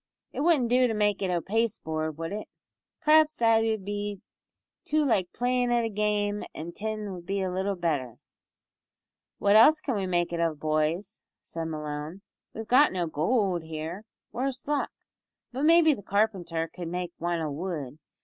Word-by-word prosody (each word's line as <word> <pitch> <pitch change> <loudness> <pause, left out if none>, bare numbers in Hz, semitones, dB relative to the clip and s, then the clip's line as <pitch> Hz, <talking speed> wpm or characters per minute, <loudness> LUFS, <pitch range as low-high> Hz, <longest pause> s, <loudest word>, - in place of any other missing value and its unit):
"It - - -5
wouldn't 295 -7 +3
do 250 +1 +4
to 225 - -2
make 210 -2 +1
it 190 - 0
o' 175 -1 0
pasteboard, 160 -8 -2
would 165 +1 -4
it? 210 - -5 0.6
P'r'aps 310 0 +5
that 225 -3 +4
'ud 220 -3 -1
be 205 -1 -3 0.6
too 305 0 +1
like 195 -9 +1
playin' 245 0 0
at 240 -1 +2
a - - -1
game, 210 0 0
an' 165 +2 -6
tin 215 +1 -4
would 175 -2 -10
be 195 -1 -1
little 190 +2 -1
better." 145 -9 -2 1.2
"What 200 +1 +3
else 300 +8 +7
can 275 - -2
we 195 -2 -1
make 175 -1 0
it 170 - -2
of, 165 -3 0
boys?" 155 +5 -1 0.2
said 165 -1 -5
Malone, 155 +3 -5 0.3
"we've 225 - -7
got 280 +4 +5
no 180 -2 -1
goold 180 - 0
here 160 +5 -6 0.3
worse 255 +3 -3
luck! 295 -1 0 0.6
but 265 +4 -1
maybe 330 -1 +6
the 235 - -7
carpenter 190 -5 0
cud 175 0 -8
make 175 +1 -3
wan 175 0 -1
o' 155 -2 -2
wood. 150 -3 -5
195 Hz, 170 wpm, -27 LUFS, 165-225 Hz, 1.2 s, else